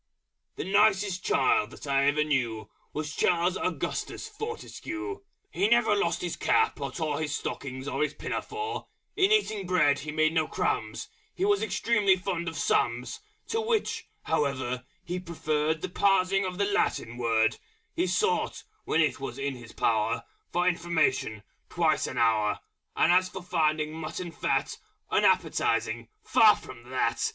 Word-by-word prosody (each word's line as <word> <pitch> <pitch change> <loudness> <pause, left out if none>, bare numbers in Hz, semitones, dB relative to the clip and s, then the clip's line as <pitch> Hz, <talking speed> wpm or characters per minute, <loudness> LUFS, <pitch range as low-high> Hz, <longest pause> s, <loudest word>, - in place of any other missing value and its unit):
_ - - -49
The - - -4
nicest 195 -1 +3
child 130 -3 +2
I 140 0 +3
ever 145 +2 +3
knew 120 -7 -1 0.2
Was 155 0 -4
Charles 175 +1 +2
Augustus 435 - -3
Fortescue. 420 -4 -6 0.3
He 200 - +2
never 235 -2 +4
lost 175 -4 0
his 175 -1 -2
cap, - - +2
or 140 -1 -3
tore 150 0 -2
His 150 -2 -1
stockings 130 0 -5
or - - -2
his 150 -1 0
pinafore: 430 0 -4 0.3
In 390 0 +3
eating 215 - +2
Bread 150 -6 +3
he 150 +2 -5
made 155 +1 +2
no 160 -2 +2
Crumbs, - - -2 0.3
He 375 - 0
was 410 0 +3
extremely 210 -1 +2
fond 180 -2 -3
of 165 - -4
sums, 120 +1 0 0.3
To 450 - 0
which, 445 -1 -1 0.2
however, 130 -3 -1 0.2
he 180 +1 -3
preferred 160 -3 -1
The 185 - -2
Parsing 195 0 +2
of 185 0 -5
a 200 - +3
Latin 120 - 0
Word 115 -2 +2 0.4
He - - +1
sought, 435 - 0 0.2
when 165 - +2
it 140 -7 +1
was 135 -2 -5
in 140 -1 -2
his 115 -2 -11
power, 115 +1 +1 0.3
For 175 +1 +1
information 155 - +1 0.3
twice 160 -3 +1
an 130 - -6
hour, 110 -3 +2 0.3
And - - +4
as 185 +1 +4
for 190 0 -8
finding 155 -3 +1
Mutton 160 +2 -5
Fat 155 - -1 0.3
Unappetising, - - +2 0.2
far - - +6
from 120 +1 -12
that! 115 -2 0
160 Hz, 155 wpm, -28 LUFS, 135-195 Hz, 0.4 s, far